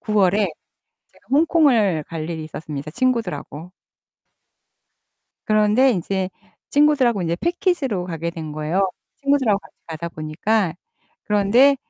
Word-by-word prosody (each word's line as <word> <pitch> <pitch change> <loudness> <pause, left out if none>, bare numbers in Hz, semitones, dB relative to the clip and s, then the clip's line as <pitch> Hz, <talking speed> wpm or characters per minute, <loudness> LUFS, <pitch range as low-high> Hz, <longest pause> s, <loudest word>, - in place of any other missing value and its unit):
9월에 205 -2 +2 0.7
제가 - - -27
홍콩을 270 - +3
갈 160 -1 -5
일이 160 -2 -4
있었습니다, 155 -1 -7
친구들하고. 180 - -2 1.7
그런데 215 +5 +4
이제 190 -1 -2 0.4
친구들하고 280 -8 +3
이제 170 -1 -1
패키지로 325 - 0
가게 170 -1 -3
된 160 -3 -7
거예요. 160 +6 0 0.3
친구들하고 275 -8 +2
같이 - - -19
가다 165 +1 -5
보니까. 165 +5 -1 0.5
그런데 215 +7 +4
200 Hz, 290 characters per minute, -21 LUFS, 165-255 Hz, 1.7 s, 그런데